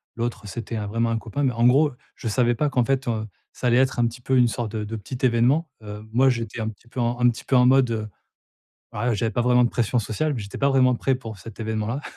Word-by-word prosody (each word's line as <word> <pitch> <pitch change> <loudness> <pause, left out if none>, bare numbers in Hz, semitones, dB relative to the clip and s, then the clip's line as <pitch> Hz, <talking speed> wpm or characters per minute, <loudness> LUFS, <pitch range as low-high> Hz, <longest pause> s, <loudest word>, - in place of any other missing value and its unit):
l'autre 115 -2 -4
c'était 115 +3 -6
un 105 -1 -3
vraiment 115 +2 0
un 115 - 0
copain 115 +6 -4
mais, 130 - +2
en 115 +1 +1
gros, 145 +4 +4 0.2
je 115 - -6
savais 120 +2 +2
pas 150 +5 0
qu'en 125 -4 +1
fait, 135 -1 0
heu, 110 -1 -2 0.3
ça 125 - -3
allait 120 +1 +4
être 130 -1 +2
un 120 - +3
petit 120 +2 -8
peu 130 +1 +1
une 125 - +5
sorte 115 -2 -3
de 105 - -3
de 115 +2 -5
petit 125 +5 -4
événement, 130 +7 +2
heu. 105 0 -8
Moi, 130 +2 +5
j'étais 115 -2 -3
un 110 - -2
petit 110 +2 -14
peu 125 +1 -4
en 120 +1 -1
un 120 0 +5
petit 115 - -5
peu 135 - +1
en 125 - +5
mode, 130 -1 +4
heu, 110 -1 -2 0.8
voilà, 120 +3 -1
j'avais 110 +2 -1
pas 120 - 0
vraiment 125 0 +4
de - - 0
pression 120 +1 0
sociale 145 +8 -2
mais 125 - -4
j'étais 100 0 -8
pas 140 - +2
vraiment 130 -2 +4
prêt 135 +2 0
pour 115 -5 -8
cet 115 +3 -12
événement-là, 110 +4 -2
120 Hz, 270 wpm, -24 LUFS, 110-130 Hz, 0.8 s, une